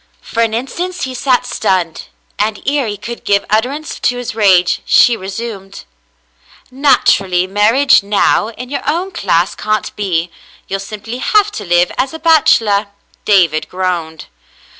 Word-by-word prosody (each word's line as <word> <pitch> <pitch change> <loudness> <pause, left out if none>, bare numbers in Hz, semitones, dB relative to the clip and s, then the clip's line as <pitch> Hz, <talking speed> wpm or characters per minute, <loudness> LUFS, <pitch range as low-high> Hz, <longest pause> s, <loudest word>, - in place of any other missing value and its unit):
For 230 - -3
an 225 -1 +1
instant 345 +9 -4
he 260 - -4
sat 255 0 +1
stunned, 175 -4 -2 0.3
and 210 0 -1
ere 280 -3 0
he 205 -1 -4
could 235 +4 -8
give 200 0 +1
utterance 265 +8 -1
to 250 - 0
his 245 -2 -5
rage, 190 -5 +3
she 240 - +4
resumed, 195 0 -7 0.9
"Naturally, 195 -9 +2
marriage 220 +9 +3
now, 205 +1 +1
in 245 +3 -9
your 285 - -2
own 345 +6 -1
class 180 - 0
can't 215 0 -2
be; 175 -4 -2 0.4
you'll 195 - -3
simply 215 +4 -7
have 420 +7 +2
to 205 - -7
live 175 0 +2
as 265 +4 -1
a - - -7
bachelor." 225 -11 +3 0.4
David 170 -7 +2
groaned. 175 -4 -3
215 Hz, 145 wpm, -15 LUFS, 190-255 Hz, 0.9 s, she